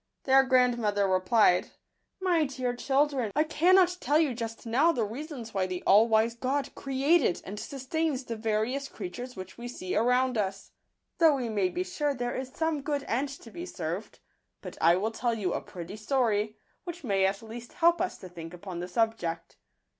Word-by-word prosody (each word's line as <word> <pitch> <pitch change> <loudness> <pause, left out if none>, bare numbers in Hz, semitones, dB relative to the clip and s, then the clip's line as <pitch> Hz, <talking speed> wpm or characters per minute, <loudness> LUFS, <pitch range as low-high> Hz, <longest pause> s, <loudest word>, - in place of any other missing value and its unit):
Their 270 0 +6
grandmother 240 -6 +2
replied, 185 0 +3 0.5
"My 350 -4 +2
dear 255 -3 -3
children, 270 -3 +1
I 305 - +4
cannot 360 +3 +4
tell 295 - +3
you 310 -5 +2
just 225 -1 -6
now 265 +9 +3
the 245 -8 -1
reasons 245 +1 -7
why 190 -1 0
the 180 -1 -5
all 210 +4 +6
wise 225 +1 +3
God 265 +4 -2
created 275 - +2
and 205 +2 -6
sustains 280 +2 -2
the 235 -2 -5
various 225 +5 -1
creatures 245 +6 -7
which 185 +3 -9
we 240 - -6
see 185 -7 -5
around 250 +1 +2
us, 195 -1 -3 0.5
though 320 -3 +6
we 250 -4 -2
may 200 -4 +1
be 180 0 -2
sure 285 +10 -2
there 245 -1 -2
is 260 0 -4
Digitized - - -25
by - - -20
Google - - -16
some 320 -3 0
good 285 -1 -2
end 265 +5 0
to 270 -4 -11
be 345 +7 -6
served; - - -5 0.4
but - - -8
I 170 +1 +6
will 210 +5 -1
tell 235 +1 -1
you 190 -5 -1
a - - -2
pretty 175 +3 -8
story, 215 -3 0 0.3
which 345 -2 -7
may 195 -5 +2
at 195 +3 -3
least 230 +2 -9
help 340 0 +3
us 365 - -2
to 185 - -10
think 170 -1 -9
upon 180 -1 -7
the 175 - -4
subject. 180 -5 -2
240 Hz, 195 wpm, -28 LUFS, 205-280 Hz, 0.5 s, Their